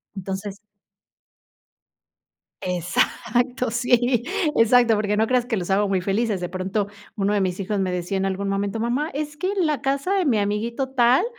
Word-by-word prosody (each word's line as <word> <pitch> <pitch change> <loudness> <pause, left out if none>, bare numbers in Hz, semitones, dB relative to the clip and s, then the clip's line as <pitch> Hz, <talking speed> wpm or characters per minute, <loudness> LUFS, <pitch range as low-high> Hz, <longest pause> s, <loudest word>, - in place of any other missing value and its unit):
Entonces 195 +2 -5 2.0
Exacto, 235 +8 0
sí. 245 0 +2 0.3
Exacto, 230 0 +5
porque 210 0 0
no 220 +1 +3
creas 250 0 +2
que 230 -3 -1
los 180 0 -3
hago 200 +1 +2
muy 190 -1 +1
felices. 200 +1 0
De 175 - -3
pronto, 190 +3 -2 0.3
1 205 0 +1
de 205 - +2
mis 185 0 -1
hijos 200 +1 -2
me 185 -1 0
decía 180 +2 -2
en 190 - 0
algún 195 +1 -2
momento: 200 +2 -1
"Mamá, 250 +7 -1
es 295 +1 -4
que 370 +5 -1
en 380 -4 +1
la 300 -5 -1
casa 275 +8 0
de 385 -2 +2
mi 250 -8 +2
amiguito 220 +6 -1
tal, 255 +5 +4
215 Hz, 175 wpm, -23 LUFS, 195-250 Hz, 2.0 s, Exacto